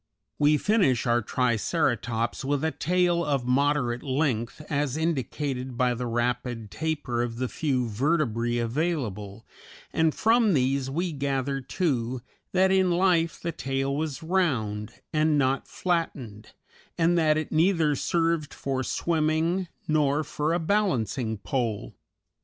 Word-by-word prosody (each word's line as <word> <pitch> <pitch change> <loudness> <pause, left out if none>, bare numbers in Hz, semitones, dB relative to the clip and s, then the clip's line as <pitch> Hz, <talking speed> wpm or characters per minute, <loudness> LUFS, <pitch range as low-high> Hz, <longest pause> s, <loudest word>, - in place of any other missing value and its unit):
We 150 +1 +4
finish 185 - +2
our 120 0 +3
Triceratops 120 - 0
with 140 +1 0
a 160 - +1
tail 175 +3 +1
of 140 -5 0
moderate 125 -2 +1
length, 130 -4 -1
as 145 -1 -1
indicated 135 -5 -2
by 125 -1 +2
the 120 +1 -3
rapid 120 -2 -2
taper 150 -7 -2
of 120 -1 -2
the 130 +2 -2
few 130 -3 -1
vertebræ 120 -1 0
available, 115 - -3 0.5
and 160 -1 +2
from 225 -4 +3
these 135 0 +1
we 170 +5 -1
gather, 135 -1 -1
too, 130 -5 -1 0.3
that 190 +1 +3
in 190 -1 +3
life 175 -2 +2
the 170 - -3
tail 135 -1 -2
was 155 +1 -3
round, 125 - 0 0.2
and 155 -1 +3
not 135 -1 +1
flattened, 140 - -3 0.4
and 170 +1 +3
that 155 -2 +3
it 155 - -3
neither 160 -2 +3
served 165 0 0
for 135 -1 -2
swimming 165 +5 0 0.2
nor 150 -1 +2
for 150 +2 -1
a - - +1
balancing 130 - 0
pole. 110 - -2
140 Hz, 130 wpm, -26 LUFS, 120-165 Hz, 0.5 s, We